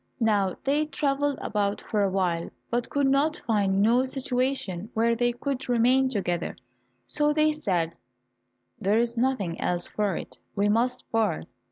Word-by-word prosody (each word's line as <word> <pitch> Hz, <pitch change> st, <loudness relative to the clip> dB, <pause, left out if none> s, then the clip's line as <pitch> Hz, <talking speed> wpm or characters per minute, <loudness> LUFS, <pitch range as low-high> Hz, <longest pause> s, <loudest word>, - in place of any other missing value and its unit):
Now 205 Hz, -5 st, +2 dB
they 290 Hz, +3 st, +1 dB
travelled 285 Hz, -1 st, 0 dB
about 205 Hz, -1 st, 0 dB
for 210 Hz, -, -1 dB
a 200 Hz, -, +2 dB
while, 180 Hz, -3 st, 0 dB, 0.2 s
but 240 Hz, 0 st, -1 dB
could 275 Hz, -1 st, +2 dB, 0.3 s
find 200 Hz, -3 st, +2 dB
no 240 Hz, +4 st, +4 dB
situations 255 Hz, -7 st, -2 dB
where 230 Hz, +1 st, +3 dB
they 240 Hz, +1 st, +2 dB
could 260 Hz, +1 st, -4 dB
remain 250 Hz, +2 st, +4 dB
together, 175 Hz, -7 st, -2 dB, 0.5 s
so 295 Hz, 0 st, +1 dB
they 310 Hz, 0 st, +3 dB
said, 180 Hz, -, -1 dB, 0.9 s
"There 200 Hz, +3 st, +2 dB
is 235 Hz, 0 st, +1 dB
nothing 230 Hz, -9 st, 0 dB
else 175 Hz, 0 st, 0 dB
for 205 Hz, -2 st, -1 dB
it, -, -, -7 dB, 0.2 s
we 205 Hz, 0 st, +2 dB
must 240 Hz, +4 st, 0 dB
part." 220 Hz, -7 st, +1 dB
230 Hz, 150 wpm, -26 LUFS, 200-265 Hz, 0.9 s, no